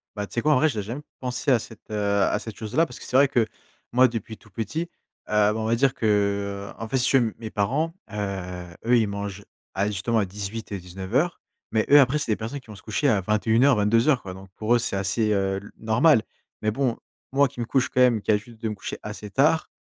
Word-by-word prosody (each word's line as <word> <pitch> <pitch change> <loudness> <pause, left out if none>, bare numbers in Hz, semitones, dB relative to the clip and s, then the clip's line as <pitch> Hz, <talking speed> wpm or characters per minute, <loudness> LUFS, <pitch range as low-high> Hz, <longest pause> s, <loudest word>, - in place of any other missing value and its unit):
Bah 105 -1 -3
tu - - -16
sais 120 - +1
quoi? 150 - +3
En 140 - +4
vrai, 155 +3 +4
j'ai 105 -6 -3
jamais 120 +8 -5 0.2
pensé 125 +2 -2
à 125 - +6
cette, 115 -1 -10
heu, 100 -1 +1
à - - +2
cette 110 -3 -7
chose 110 +2 -7
là. 165 +2 +5
Parce - - -10
que - - -9
c'est - - -4
vrai 140 - +6
que, 120 -4 +1 0.5
moi 130 +1 +6
depuis 115 -2 -6
tout 105 - -21
petit, 115 - -3
heu, - - -10 0.4
bah 105 0 +3
on 110 - -2
va 115 +1 +2
dire 135 +2 +2
que, 100 -2 0
en 115 - -5
fait, 130 - 0
si 125 - +2
tu 135 - +5
veux 125 - +3
m - - -13
mes 110 -1 -6
parents, 140 +12 0 0.2
heu, 95 -3 -4 0.2
eux, 120 +1 +5
ils 110 - +1
mangent, 100 0 -5 0.3
à 100 +2 0
justement, 110 +3 0
à 100 - +1
18 105 +3 -6
et 100 - -2
19:00. 95 - -2 0.3
Mais 110 -1 +1
eux, 145 +1 +9
après, 140 +3 +4
c'est 120 - -1
des - - +3
personnes 115 +6 -5
qui 125 - -22
vont 105 - -10
se 100 - -14
coucher 115 +7 0
à 100 -3 +2
21:00-22:00, 115 +4 +3
quoi. 95 -1 -8
Donc 95 0 -12
pour 110 +3 +2
eux, - - +5
c'est 100 - -2
assez, 100 +3 0
heu, 95 -1 0
le 100 - -13
normal. 115 +4 +4 0.4
Mais 110 - +1
bon, 120 +1 0 0.4
moi 140 +1 +4
qui 125 - -13
me 120 - -1
couche 130 +2 +1
quand 125 - -1
même, 120 -4 +4
qui - - -11
a 105 - +6
l'habitude 110 +2 -7
de 110 -1 -2
me 105 - -4
coucher 95 - -6
assez 105 -1 -7
tard, 155 +6 +2
110 Hz, 260 wpm, -25 LUFS, 100-125 Hz, 0.5 s, eux